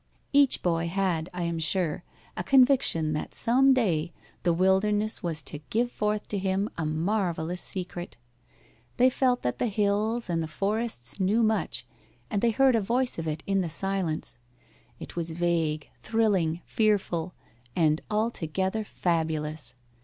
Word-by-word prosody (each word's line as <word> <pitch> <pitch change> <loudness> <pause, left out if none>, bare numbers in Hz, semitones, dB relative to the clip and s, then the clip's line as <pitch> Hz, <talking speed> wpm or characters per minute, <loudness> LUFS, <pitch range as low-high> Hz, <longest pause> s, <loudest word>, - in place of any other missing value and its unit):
Each 280 -2 +4
boy 170 -1 +1
had, 180 -2 -1
I 180 -1 -4
am 170 -1 -2
sure, 165 +2 +1 0.3
a 175 - -3
conviction 250 - +4
that 150 - -4
some 265 +4 +4
day 175 -10 +1 0.3
the 175 - +2
wilderness 195 +4 +2
was 160 -4 -2
to 145 - -4
give 240 +2 +1
forth 210 -2 -1
to 205 - -1
him 195 +2 0
a 160 -2 -2
marvellous 175 +1 -1
secret. 175 - -5 0.8
They 255 +1 +5
felt 250 -1 +1
that 125 - -2
the 245 - +1
hills 210 +3 0
and 170 -2 0
the 160 - -3
forest 200 - -1
knew 205 +5 +2
much, 220 0 0 0.5
and 205 -2 0
they 235 - +4
heard 260 +2 +4
a 225 - +2
voice 245 +1 0
of 165 - -4
it 155 0 -3
in 195 -1 +1
the 175 - -2
silence. 180 -6 -2 0.6
It - - -9
was 170 -1 -2
vague, 165 -2 -1
thrilling, 195 -7 +1
fearful, 190 -6 0 0.4
and 155 -2 +2
altogether 210 -2 -1
fabulous. 155 - -1
185 Hz, 150 wpm, -27 LUFS, 165-215 Hz, 0.8 s, They